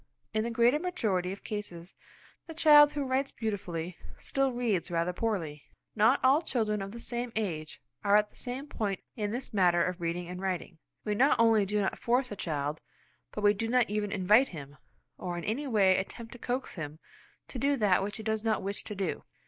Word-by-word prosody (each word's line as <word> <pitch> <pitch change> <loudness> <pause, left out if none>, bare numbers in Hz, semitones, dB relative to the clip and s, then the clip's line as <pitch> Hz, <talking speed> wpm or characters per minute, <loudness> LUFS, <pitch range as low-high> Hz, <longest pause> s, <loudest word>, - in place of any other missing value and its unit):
In 215 0 +1
the 235 - -2
greater 235 +5 +3
majority 215 - -1
of 195 - -8
cases 190 -4 -6 0.5
the 325 - -8
child 295 -2 +7
who 290 -1 -1
writes 265 +1 0
beautifully, 180 -6 -4 0.2
still 275 -1 0
reads 230 -8 -1
rather 170 +1 0
poorly. 170 -9 -3 0.3
Not 225 +5 +4
all 270 +4 +5
children 215 -9 -1
of 195 0 -5
the 235 - -8
same 240 +1 -3
age 165 -8 -3 0.2
are 200 0 +4
at 210 0 +3
the - - -25
same 255 +2 -4
point 205 -9 -3
in 210 -4 -2
this 245 +3 -5
matter 175 -4 +4
of 180 -1 -4
reading 170 +1 -2
and 180 +1 -6
writing. 185 -3 -3 0.3
We 210 - 0
not 255 +3 +3
only 225 -3 +4
do 210 +1 0
not 195 - -2
force 250 +1 +1
a - - -3
child, 150 -4 -3 0.5
but 210 - -5
we 205 0 +6
do 225 +2 -3
not 240 -2 +2
even 210 -1 -1
invite 210 +6 +4
him, 145 -3 -9 0.4
or 175 -1 -4
in 170 - -5
any 270 +7 -2
way 200 -6 +4
attempt 225 +4 -6
to 245 - -11
coax 250 +3 -3
him 155 -3 -6 0.5
to 255 - -6
do 280 +2 +2
that 200 -6 +3
which 205 +3 -3
he 220 - -7
does 220 0 -1
not 220 -3 0
wish 200 +1 -3
to 210 - -6
do. 190 -3 -3
210 Hz, 205 wpm, -30 LUFS, 185-240 Hz, 0.5 s, child